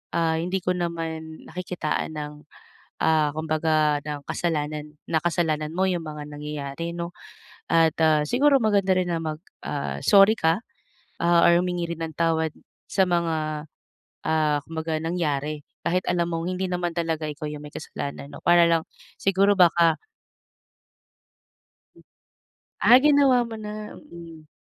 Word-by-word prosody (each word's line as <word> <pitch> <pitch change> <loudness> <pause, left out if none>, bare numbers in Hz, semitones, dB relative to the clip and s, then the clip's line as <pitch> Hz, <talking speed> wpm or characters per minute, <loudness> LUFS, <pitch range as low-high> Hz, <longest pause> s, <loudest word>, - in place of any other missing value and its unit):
ah, 165 -1 +2
hindi 180 +3 -1
ko 180 - +1
naman 165 -2 -4
nakikitaan 180 -3 -3
ng, 150 -1 -5 0.7
ah, 155 -2 +3
kumbaga 155 -1 +1
ng 150 -1 -4
kasalanan 150 -2 -2
na 160 - +2
kasalanan 155 -3 0
mo 190 +1 +2
yung 175 -2 -1
mga 150 -1 -6
nangyayari 150 +2 -5
'no, 170 0 -4 0.6
at 165 -1 +4
ah, 155 -1 +4
siguro 275 - +4
maganda 200 -3 +3
rin 180 -1 0
na 165 - -1
mag 155 -1 -3 0.3
ah, 145 -1 -3
sorry 200 +1 +7
ka, 160 +2 +2 0.6
ah, 170 0 +4
or 170 0 +5
humingi 175 -2 -2
rin 165 - -14
ng 160 -1 -7
tawad 160 -1 +1 0.4
sa 190 - +3
mga, 160 -3 -1 0.6
ah, 155 -2 +2
kumbaga 160 0 -3
nangyari 155 -3 -2 0.2
kahit 180 +1 +1
alam 175 -1 +1
mong 165 +1 -2
hindi 185 +1 -2
naman 175 -1 -1
talaga 165 -2 -1
ikaw 150 +1 -6
yung 150 0 -7
may 150 - -10
kasalanan 140 0 -6
'no - - -10
para 175 0 +6
lang 165 -1 +2 0.4
siguro 195 +1 +3
baka 170 -2 +5 2.8
Ah, 245 - +8
ginawa 280 -4 +5
mo 230 -1 -7
na, 210 0 -7 0.2
mm. 165 -2 -11
165 Hz, 140 wpm, -25 LUFS, 155-180 Hz, 2.8 s, Ah